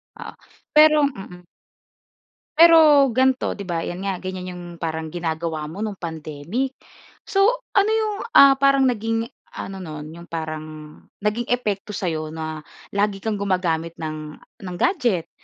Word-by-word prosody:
Oo, - - -9 0.4
pero 305 -1 +7
mm. 190 -9 -4 1.1
Pero 335 0 +8 0.4
ganito 260 +1 +2
di 200 - -9
ba 165 -1 -1
yan 175 +2 -5
nga 195 -2 -2
ganyan 185 0 -6
yung 175 - -9 0.2
parang 160 -1 -4
ginagawa 160 -2 -3
mo 205 +7 -4
nung 210 - -3
pandemic, 165 - -4 0.5
so 405 +3 +3 0.2
ano 410 +2 +4
yung 435 -2 0 0.2
ah, 275 -1 +8
parang 275 -1 +4
naging 225 0 -2 0.2
ano 195 0 -6
noon 155 -4 -7
yung 170 - -11
parang, 155 -1 -4 0.6
naging 210 +3 -1
epekto 210 -4 -2
sa'yo 160 -5 -3
na 155 -1 -6 0.2
lagi 200 -1 -1
kang 220 -2 -2
gumagamit 175 -4 -1
ng 155 -1 -6 0.2
ng 180 -1 -5
gadget 240 - +1
190 Hz, 140 wpm, -22 LUFS, 160-250 Hz, 1.1 s, Pero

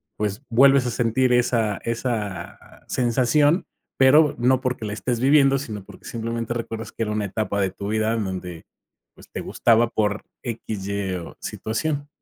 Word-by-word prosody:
pues, 105 +2 -2
vuelves 135 +2 +5
a 125 - -1
sentir 125 +2 +2
esa 115 -4 +2
esa 110 -6 -3 0.3
sensación, 135 +7 +2 0.3
pero 145 +3 +5
no 130 +2 +3
porque 125 -3 -2
la 105 - -3
estés 115 +4 -2
viviendo, 135 +1 +5
sino 110 -8 -6
porque - - -15
simplemente 115 0 -3
recuerdas 115 -1 -5
que - - -3
era 105 - -2
una 105 -1 -1
etapa 100 +1 -2
de 95 -2 +1
tu 100 +2 -6
vida 110 +1 +1
en 115 -2 -1
donde, 90 -3 -6 0.5
pues, - - -17
te - - -5
gustaba 115 0 +3
por 105 -2 -1 0.2
X, 110 -4 -5
Y 100 -2 -2
o 85 -2 -7
situación. 145 +6 -3
115 Hz, 165 wpm, -23 LUFS, 105-130 Hz, 0.5 s, vuelves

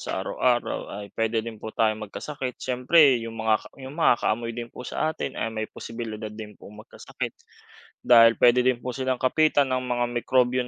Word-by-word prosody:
sa - - -3
araw-araw 120 -1 0
ay 100 - -9
puwede 115 0 -1
din 110 -2 -8
po 110 - -6
tayong 110 -1 0
magkasakit. 135 +1 -6
Siyempre, 130 +1 +4
yung 115 0 -7
makaka 110 -1 +1
yung 130 +1 -8
makakaamoy 115 -6 +1
din 120 -1 -5
po 125 - -9
sa 155 0 -1
atin - - -5
ay 115 - -1
may 110 -1 -3
posibilidad 110 -2 -7
din 105 -1 -10
pong 105 +1 -13
magkasakit. - - -7 0.7
Dahil 115 -1 +7
puwede 125 +1 +5
din 130 -1 +3
po 125 - -3
silang 130 0 -2
kapitan 145 +1 +3
ng 130 - +1
mga 125 -1 -1 0.2
mikrobyo 125 0 +2
120 Hz, 180 wpm, -25 LUFS, 110-130 Hz, 0.7 s, Dahil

